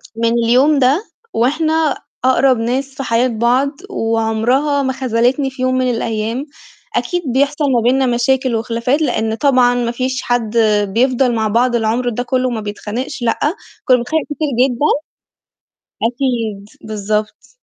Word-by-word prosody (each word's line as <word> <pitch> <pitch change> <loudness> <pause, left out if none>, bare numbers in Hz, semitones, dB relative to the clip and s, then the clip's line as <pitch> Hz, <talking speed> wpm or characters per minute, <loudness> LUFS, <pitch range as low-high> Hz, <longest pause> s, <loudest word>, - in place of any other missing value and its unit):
من 230 0 +1
اليوم 270 +5 +4
ده 275 - +2 0.3
وإحنا 310 +5 +1 0.3
أقرب 260 -1 +4
ناس 260 +4 -2
في 270 - -4
حياة 235 +1 +2
بعض، 245 +4 +1 0.2
وعمرها 230 - 0
ما 265 -1 -1
خذلتني 255 +2 0
في 260 0 -9
يوم 255 0 +1
من 255 -1 +1
الأيام، 225 +2 -2 0.5
أكيد 355 -1 -1
بيحصل 285 +1 +1
ما 240 - +3
بيننا 260 +3 +2
مشاكل 250 0 +1
وخلافات 235 +6 -1
لإن 225 -6 0
طبعًا 255 -2 +3
ما 240 -1 -1
فيش 255 +1 -2
حد 235 -2 -1 0.4
بيفضل 250 0 +2
مع 220 -1 0
بعض 240 +3 +2
العمر 235 +2 0
ده 240 +1 -3
كُلّه 255 0 0
ما 225 -3 -3
بيتخانقش 215 +6 -5
لأ، 230 -1 0 0.5
كُنّا 255 - +5
بنتخانق 295 +6 -1
كتير 300 +1 -3 0.2
جدًا، 250 +4 -1 1.2
أكيد، 230 -4 -2 0.2
بالضبط. 210 0 -3
245 Hz, 145 wpm, -17 LUFS, 230-265 Hz, 1.2 s, كُنّا